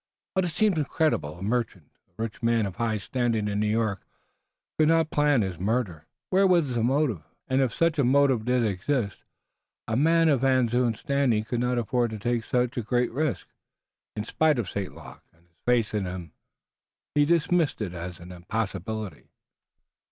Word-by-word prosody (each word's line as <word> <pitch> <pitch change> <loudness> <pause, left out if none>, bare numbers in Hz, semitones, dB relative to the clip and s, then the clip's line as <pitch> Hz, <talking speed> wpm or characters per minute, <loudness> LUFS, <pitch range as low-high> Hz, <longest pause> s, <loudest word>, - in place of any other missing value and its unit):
But 190 -1 +1
it - - 0
seemed 180 +2 +1
incredible. 145 - 0
A 90 - -8
merchant, 105 -7 -2 0.2
a 90 - -41
rich 115 -1 -6
man 115 -2 +2
of 100 -1 -6
high 115 -2 0
standing 115 0 -1
in 100 0 -1
New 105 - +1
York, 110 -3 0 0.8
could 155 - +5
not 165 -1 +3
plan 145 -5 +3
his 95 -4 -4
murder. 95 -6 -1 0.2
Where 195 +1 +5
was 170 -8 +3
the 120 - 0
motive? 130 - +1 0.3
And, 130 0 +2
if 130 -3 +1
such 165 -2 +1
a - - +4
motive 130 -2 +3
did 125 0 +1
exist, 105 +2 -1 0.7
a 110 - -1
man 165 +5 +4
of 140 -5 +3
Van 130 -3 +3
Zoon's 120 -2 0
standing 140 -6 +1
could 120 +2 -3
not 125 0 0
afford 120 +1 0
to 110 - -5
take 120 +2 -1
so 125 0 +2
great 120 0 -1
a - - -16
risk. 145 0 -1 0.7
In 105 - -3
spite 155 +6 +2
of 115 -5 -2
St. 100 -2 -3
Luc - - -12
and 85 +1 -29
his 85 -1 -38
faith 120 -3 +2
in 100 -3 -1
him 90 -3 -6 0.8
he 145 - +4
dismissed 170 0 +2
it 100 -5 -3
as 90 0 -7
an 90 +1 -11
impossibility. 100 +2 -4
120 Hz, 185 wpm, -26 LUFS, 105-140 Hz, 0.8 s, could